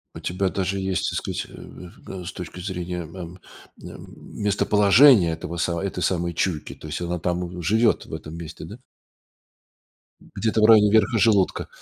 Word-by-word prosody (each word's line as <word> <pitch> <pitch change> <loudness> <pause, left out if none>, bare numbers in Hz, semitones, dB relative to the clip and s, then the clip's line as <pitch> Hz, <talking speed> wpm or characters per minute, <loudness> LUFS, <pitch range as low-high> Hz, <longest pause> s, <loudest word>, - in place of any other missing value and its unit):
У - - -7
тебя 95 +2 -1
даже 95 +1 -2
есть, 95 -1 -1
так - - -3
сказать, - - -4
э, 90 +1 -11
с 85 - -6
точки 90 0 -8
зрения, 90 -1 -5
эм, 85 +2 -9 0.4
м, - - -11 0.3
местоположение 105 - +5
этого 80 +1 -6
са 85 0 -1
этой 95 -2 -3
самой 85 -1 -1
чуйки, 85 -3 -2
то - - -14
есть 75 +3 -5
она 85 0 -2
там 90 +1 -3
живет 110 +6 +2
в - - -13
этом 80 - -7
месте, 80 -1 -8
да? 105 +7 -10 1.6
Где-то 110 -1 0
в 110 - +6
районе 110 -2 +7
верха 110 +1 +3
желудка. 100 -4 +2
90 Hz, 165 wpm, -23 LUFS, 85-100 Hz, 1.6 s, районе